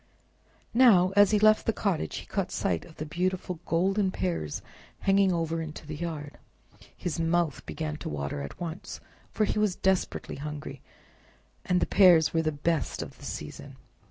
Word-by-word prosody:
Now, 205 -7 +6
as 205 -1 +7
he 210 - +3
left 215 +1 +4
the - - +5
cottage, 190 - -1
he - - -6
caught - - -2
sight 85 -3 -1
of 160 - -15
the 155 - -5
beautiful 180 +1 -2
golden 190 +4 +2
pears 170 - -3 0.4
hanging 195 -1 +4
over 165 -1 -1
into 155 0 -7
the 155 0 -6
yard. 150 -3 -5 0.6
His 170 -1 -3
mouth 165 -2 +1
began 155 -1 -4
to - - -6
water 70 -1 -3
at 70 - -8
once, 170 +1 -6 0.3
for 215 - +1
he 210 - -1
was 210 -4 +2
desperately 190 -1 -1
hungry, 145 -1 -6 0.8
and 180 0 +2
the - - +3
pears 175 -5 +6
were 165 - +3
the 155 -1 0
best 155 +2 -1
of - - -12
the - - -11
season. - - -7
170 Hz, 170 wpm, -28 LUFS, 155-190 Hz, 0.8 s, as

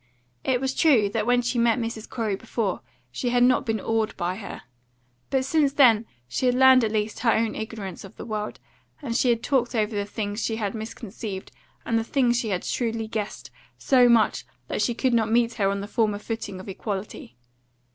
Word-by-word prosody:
It 255 -2 +1
was 265 0 -1
true 250 -12 +4
that 215 +1 -2
when 245 0 +3
she 245 0 0
met 235 0 +3
Mrs. 230 -2 -4
Corey 220 -5 -1
before 215 -1 -3 0.3
she 245 - -2
had 245 0 +3
not 250 +1 +3
been 220 -1 0
awed 225 +1 -1
by 180 0 -1
her; 200 - -8 0.7
but 265 -1 +1
since 290 -1 +2
then 235 -6 +5 0.2
she 255 - -1
had 250 - +3
learned 260 -1 +7
at 220 - 0
least 215 0 -1
her 230 0 +3
own 225 0 +1
ignorance 215 -4 -6
of 195 - -12
the - - -8
world, 215 -2 -4 0.4
and 245 -6 -4
she 250 - +3
had 230 -1 +1
talked 250 -2 +1
over 215 -1 0
the 205 0 -1
things 205 +1 -4
she 225 - -1
had 210 -3 -2
misconceived 220 -3 -7 0.3
and 230 -1 +1
the - - -1
things 240 -1 +2
she 230 - -2
had 185 -3 -1
shrewdly 225 -2 -2
guessed 215 -1 -5 0.3
so 250 -2 +4
much 230 -2 +3 0.3
that - - -1
she 240 - +1
could 255 0 +1
not 220 -2 +2
meet 235 0 +3
her 200 -4 +1
on 200 0 -2
the 200 - -6
former 215 -2 +1
footing 205 -3 -5
of 185 - -10
equality. 195 - -6
225 Hz, 205 wpm, -25 LUFS, 210-245 Hz, 0.7 s, learned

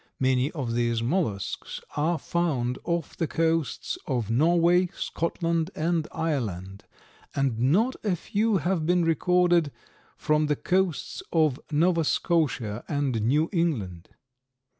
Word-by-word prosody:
Many 130 +1 +2
of 130 -8 -3
these 120 -1 0
mollusks 115 - -2 0.2
are 160 +3 +1
found 140 -9 -1
off 170 -2 -2
the 165 - -1
coasts 165 -1 -1
of 120 -6 -1
Norway, 170 +7 +4
Scotland 165 0 -1
and 165 0 0
Ireland, 100 - -3 0.5
and 135 -5 0
not 190 - +2
a 200 -5 +1
few 210 +5 0
have 175 -2 -1
been 175 -1 +3
recorded 175 -1 +3 0.5
from 150 0 +1
the 150 - +1
coasts 185 +1 -1
of 155 -5 +2
Nova 165 +2 +3
Scotia 145 - 0
and 140 -6 -1
New 145 +9 +2
England. 110 - -1
155 Hz, 120 wpm, -26 LUFS, 125-170 Hz, 0.5 s, Norway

